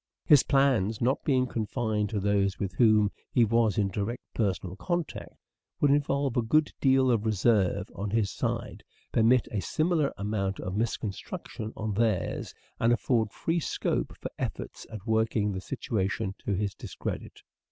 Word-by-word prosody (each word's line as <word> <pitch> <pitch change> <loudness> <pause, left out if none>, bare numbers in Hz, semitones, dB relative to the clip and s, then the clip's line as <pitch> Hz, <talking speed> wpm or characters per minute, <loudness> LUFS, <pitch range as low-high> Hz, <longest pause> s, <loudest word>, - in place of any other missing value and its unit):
His 150 -5 +7
plans 130 -7 +2
not 130 +3 +1
being 130 -3 +2
way."* - - -10
confided 110 -2 -1
to 110 - -1
those 100 -1 +1
with 100 -1 -3
whom 110 -3 +4 0.2
he 120 - +4
was 115 -2 +2
in 100 -2 +2
direct 105 +5 -3
personal 95 -4 -1
contact, 175 - -3 0.4
would 145 - +4
involve 140 -2 +1
a 120 - +3
good 150 +7 +2
deal 130 -1 +4
of 115 -3 +1
reserve 100 -3 +2
on 100 +1 -4
his 105 -2 +1
side, - - -3 0.3
permit 115 +2 +4
a 105 - -1
similar 155 - +1
amount 100 -1 -2
of 95 +1 -4
misconstruction 110 0 -4
on 110 -1 -2
theirs, 110 -3 0 0.3
and 115 - +3
afford 115 -1 +2
free 165 +1 -1
scope - - -2
for - - -6
efforts - - -5
at 105 -3 -8
working 110 -2 +1
the 95 -1 -4
situation 100 -5 -2
to 100 - +1
his 100 0 -1
discredit. - - -6
110 Hz, 160 wpm, -28 LUFS, 100-125 Hz, 0.4 s, His